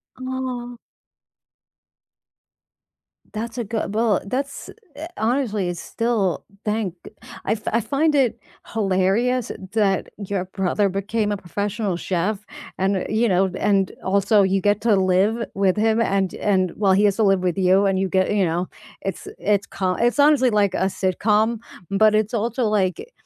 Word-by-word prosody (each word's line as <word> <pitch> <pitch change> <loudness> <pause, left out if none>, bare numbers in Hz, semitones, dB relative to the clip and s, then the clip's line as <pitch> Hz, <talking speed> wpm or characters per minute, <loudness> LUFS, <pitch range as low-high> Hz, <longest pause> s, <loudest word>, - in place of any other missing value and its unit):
Aw. 255 -2 -5 2.6
That's 225 +2 -5
a 240 - -1
good 215 -1 -3
well, 220 -2 +2
that's 275 +6 -4 0.3
eh, 310 +3 -6
honestly, 220 -4 0
it's 175 -2 -4
still 225 -6 -1 0.2
thank 210 -4 -1
g - - -10 0.3
I - - 0
f 220 - -7
I 230 - +3
find 295 +6 +1
it 260 -5 +2 0.3
hilarious 210 +4 +1 0.2
that 205 -3 +1
your 200 -2 -3
brother 195 +2 0
became 205 +3 -1
a - - -3
professional 200 +1 -3
chef, 195 +4 -2 0.3
and, 190 0 0
you 220 +3 +2
know 190 -1 +2
and 195 -2 +2
also 200 +2 +3
you 190 0 +1
get 205 0 +2
to 225 -3 +3
live 195 +5 +2
with 195 -1 +2
him, 220 +1 +2
and 195 -4 0
and 185 -3 +1
well, 195 -2 +3
he 200 +2 +3
has 200 -2 +3
to 225 - +2
live 195 -2 +3
with 180 -1 -1
you, 190 +1 +4
and 195 -1 +1
you 190 - 0
get, 185 0 +1
you 200 -2 +2
know 175 +2 -2 0.3
it's 195 -3 -5
it's 200 -1 +1
co 185 -1 -1
it's, 240 +6 +1
honestly, 285 -3 +5
like 205 -4 +2
a 190 - 0
sitcom, 210 +4 +1 0.3
but 215 +2 +4
it's 215 +1 0
also 235 +3 -1
like, 210 - 0
205 Hz, 160 wpm, -22 LUFS, 190-230 Hz, 2.6 s, honestly